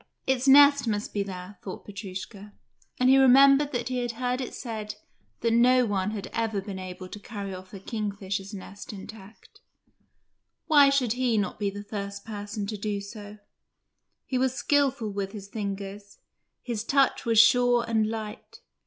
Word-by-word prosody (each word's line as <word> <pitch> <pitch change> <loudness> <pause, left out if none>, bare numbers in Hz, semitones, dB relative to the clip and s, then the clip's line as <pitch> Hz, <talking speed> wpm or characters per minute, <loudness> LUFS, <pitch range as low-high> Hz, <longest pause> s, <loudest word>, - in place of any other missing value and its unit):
"Its 265 0 0
nest 285 -1 +7
must 210 -1 -2
be 205 - 0
there," 185 0 -7
thought 190 - -8
Petrushka, 200 0 -8 0.5
and 250 - +3
he 265 +1 +6
remembered 275 +2 +6
that 245 -1 -2
he 255 -1 -1
had 240 -1 -2
heard 250 +2 -2
it 255 - -5
said 215 -3 -6 0.5
that 230 0 +1
no 250 +2 +5
one 200 -2 -1
had 210 -3 -5
ever 225 -3 -1
been 195 -1 -6
able 185 0 -7
to 210 - -9
carry 200 -2 -6
off 185 0 -10
a 195 - -8
kingfisher's 200 -2 -4
nest 200 0 -9
intact. 205 +1 -12 1.0
Why 290 -4 +6
should 260 -5 +1
he 245 -2 +1
not 205 0 -2
be 205 -1 0
the 205 +1 -7
first 200 -1 -6
person 205 -1 -5
to 210 +1 -4
do 205 0 -2
so? 205 +1 -10 0.9
He 255 - -1
was 260 0 +1
skilful 270 -7 +1
with 195 -1 -4
his 200 -2 -8
fingers, 200 -1 -6 0.5
his 230 -4 -3
touch 275 +2 +2
was 230 -1 +1
sure 245 +1 +5
and 220 -2 +1
light. 220 -1 -7
215 Hz, 170 wpm, -27 LUFS, 200-245 Hz, 1.0 s, nest